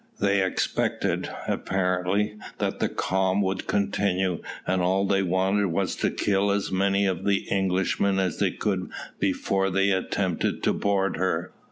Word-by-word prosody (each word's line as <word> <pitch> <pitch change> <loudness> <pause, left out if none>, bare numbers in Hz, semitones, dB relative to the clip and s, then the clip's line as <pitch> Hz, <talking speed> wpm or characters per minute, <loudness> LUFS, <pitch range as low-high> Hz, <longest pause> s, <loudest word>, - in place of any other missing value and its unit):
They 100 -1 +3
expected, 95 - -1 0.2
apparently, 95 +2 0 0.2
that - - -2
the - - +1
calm 95 +1 0
would 95 0 -2
continue, 95 -2 0 0.2
and 95 0 +1
all 95 +2 +2
they 100 0 +2
wanted 95 +2 +1
was 95 +2 -1
to - - +1
kill 100 0 +1
as 100 0 0
many 100 +1 +2
of 95 -1 -1
the 100 -1 +1
Englishmen 95 0 +1
as 95 -4 0
they - - +3
could 95 -3 -2 0.3
before 95 0 +1
they 95 +1 +2
attempted 95 -1 -1
to - - +3
board 100 -1 0
her. 90 -1 -1
95 Hz, 150 wpm, -26 LUFS, 95-100 Hz, 0.3 s, They